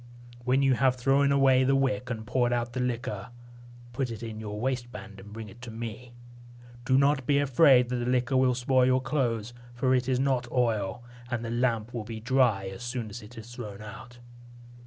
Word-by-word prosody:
When 130 +2 +3
you 135 -1 +4
have 125 +1 +2
thrown 135 +3 +2
away 135 -2 +4
the 135 +1 +3
wick 130 -2 0
and 110 -3 -4
poured 120 +1 +1
out 120 0 -1
the 130 - -3
liquor, 125 0 -3 0.6
put 130 +1 -2
it 115 0 -7
in 110 -2 -6
your 105 -1 -6
waistband 120 -6 -4
and 105 +2 -12
bring 110 0 -7
it 105 +4 -14
to 125 - -8
me. 115 +2 -7 0.7
Do 130 +1 +3
not 140 -1 +2
be 145 - +3
afraid 135 -2 +5
that 125 - -1
the 120 0 -2
liquor 125 +1 +1
will 130 -1 +3
spoil 125 +1 +3
your 130 0 +3
clothes, 120 -5 -1 0.2
for 130 +1 +1
it 130 0 +1
is 125 -1 +1
not 130 -3 0
oil, 115 -4 0 0.3
and 120 -2 -3
the 115 - -4
lamp 120 -2 0
will 120 -3 -3
be 110 0 -7
dry 120 -5 +2
as 95 +5 -9
soon 120 -3 -4
as 120 - -7
it 110 +3 -13
is 115 +2 -10
thrown 105 -4 -8
out." 120 +3 -11
125 Hz, 205 wpm, -28 LUFS, 115-130 Hz, 0.7 s, afraid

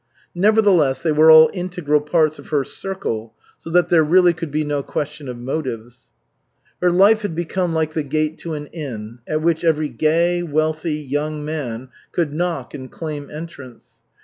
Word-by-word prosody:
Nevertheless, 180 -9 +3
they 165 - +2
were 155 +1 +5
all 160 0 +8
integral 175 -5 -1
parts 155 0 +1
of - - -12
her 145 -3 +1
circle, 115 - -5 0.2
so - - -10
that 175 +1 +3
there 170 -3 +5
really 175 +3 +4
could 165 -1 -6
be 155 +2 -1
no 145 -1 -1
question 150 0 -5
of 125 - -6
motives. 125 -2 -5 0.7
Her 180 - +4
life 200 +5 +5
had 205 -6 -4
become 175 0 -2
like 155 -1 0
the 160 - -1
gate 155 +2 -2
to 165 -2 -5
an 150 0 -6
inn, 120 -8 -7
at 155 0 -1
which 165 0 +1
every 155 -2 +1
gay, 170 +3 +1
wealthy, 155 0 -1
young 150 +1 -3
man 130 -5 -5 0.2
could 160 -4 -1
knock 175 +1 -3
and 130 -2 -8
claim 150 -3 -6
entrance. 150 -6 -11
155 Hz, 175 wpm, -20 LUFS, 145-170 Hz, 0.7 s, all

